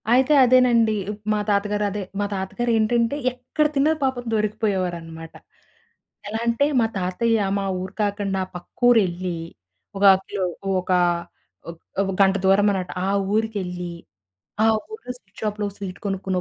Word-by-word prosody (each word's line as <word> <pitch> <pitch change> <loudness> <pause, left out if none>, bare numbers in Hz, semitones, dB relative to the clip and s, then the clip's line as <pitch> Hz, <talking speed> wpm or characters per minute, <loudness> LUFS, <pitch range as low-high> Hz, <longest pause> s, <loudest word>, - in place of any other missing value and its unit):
అయితే 260 +4 +4
అదేనండి. 240 -3 +4 0.2
ఇప్ 210 0 -9
మా 210 - 0
తాతగారు 205 +1 +1
అదే 205 +1 -4 0.2
మా 205 - +1
తాతగారేంటంటే 230 +4 0 0.2
ఎక్కడ 255 +5 -1
తిన్నా 285 +3 +3
పాపం 260 -2 0
దొరికిపోయేవారన్నమాట. 185 -7 -2 0.9
ఎలా 220 +2 -3
అంటే 235 +4 +2
మా 230 - +3
తాతయ్య 210 +4 +1 0.2
మా 195 - -2 0.2
ఊరు 185 0 -6
కాకుండా 200 -2 -1
పక్కూరెళ్లి 185 -3 +1 0.6
ఒక 195 - -2 0.2
కిలో 200 -2 -3
ఒక - - -21 1.1
ఒక 170 - -8 0.2
ఓ - - +2 0.2
గంట 195 0 +5
దూరమనమాట. 195 -1 +3 0.2
ఆ - - 0 0.3
ఊరికెళ్ళి 185 -6 -2 0.7
ఆ - - +5 0.3
ఊరిలో 435 - -7
స్వీట్ 195 0 -19
షాప్‌లో 210 -1 -2
స్వీట్ 190 -3 -7
కొనుక్కుని 190 -1 -2
205 Hz, 130 wpm, -23 LUFS, 190-230 Hz, 1.1 s, గంట